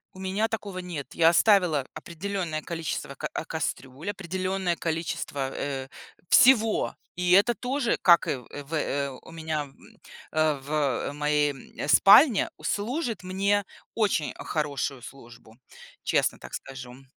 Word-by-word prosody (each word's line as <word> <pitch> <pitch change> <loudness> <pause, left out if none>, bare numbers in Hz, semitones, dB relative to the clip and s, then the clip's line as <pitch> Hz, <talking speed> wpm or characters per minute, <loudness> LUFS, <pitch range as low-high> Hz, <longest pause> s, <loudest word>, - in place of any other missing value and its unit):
У - - -11
меня 190 +4 0
такого 210 -4 -5
нет. 175 -6 -6
Я 165 -1 +6
оставила 170 -7 +3
определённое 170 -2 -4
количество, 160 -4 -4
ка - - -5
а, - - -4
кастрюль, 150 +1 -4
определённое 185 -1 -2
количество, 160 -5 -3
э, 135 -2 -4 0.4
всего. 225 -4 +5 0.2
И 180 0 0
это 205 +6 +5
тоже, 250 +3 -1
как 170 -2 +6
и - - 0
в 125 -3 -12 0.2
в, 145 +4 -11
э, 140 -2 -1
у 130 +4 -12
меня, 160 -2 -3
м, 135 -2 -17 0.3
а, 155 -2 +1 0.5
в - - -9
моей, 150 0 +1
м, 135 +1 -8
спальне, 210 - +7
у - - -18
служит 230 - -2
мне 200 +2 +1 0.3
очень 205 -9 +1
хорошую 140 -3 -3
службу. 120 -3 -13 0.5
Честно - - +1
так - - -12
скажу. 125 0 -8
165 Hz, 140 wpm, -26 LUFS, 145-195 Hz, 0.5 s, спальне